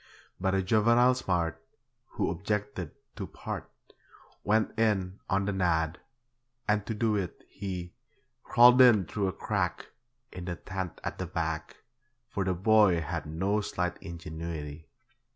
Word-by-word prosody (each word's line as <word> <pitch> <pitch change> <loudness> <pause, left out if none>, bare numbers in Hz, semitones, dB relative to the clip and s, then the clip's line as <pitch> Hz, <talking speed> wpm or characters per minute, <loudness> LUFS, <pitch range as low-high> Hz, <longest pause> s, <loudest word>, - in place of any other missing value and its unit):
But 95 +1 +1
a 95 - +1
juvenile 115 +5 +4
smart, 85 -8 -1 0.5
Who - - 0
objected 105 +3 -2 0.3
to 100 -4 -4
'part', - - -6 0.7
Went 110 +1 +2
in 100 -4 +1
'on 100 0 +1
the 100 - 0
nod', 85 -3 +1 0.7
and 105 -1 +2
to 110 - -2
do 110 0 +1
it 95 -4 -3
he 90 -3 -6 0.5
Crawled 125 +1 +7
in 110 -7 +7
through 100 +4 -1
a - - 0
crack - - -2 0.4
In 90 -1 -7
the 90 -1 -3
tent 95 0 -5
at - - -4
the - - -3
back, - - -3 0.5
For 100 - -1
the 95 -1 0
boy 100 -2 +5
had 80 -1 -4
no 95 +7 0
slight 90 -3 -2
ingenuity. 80 -2 -6
95 Hz, 140 wpm, -29 LUFS, 85-105 Hz, 0.7 s, Crawled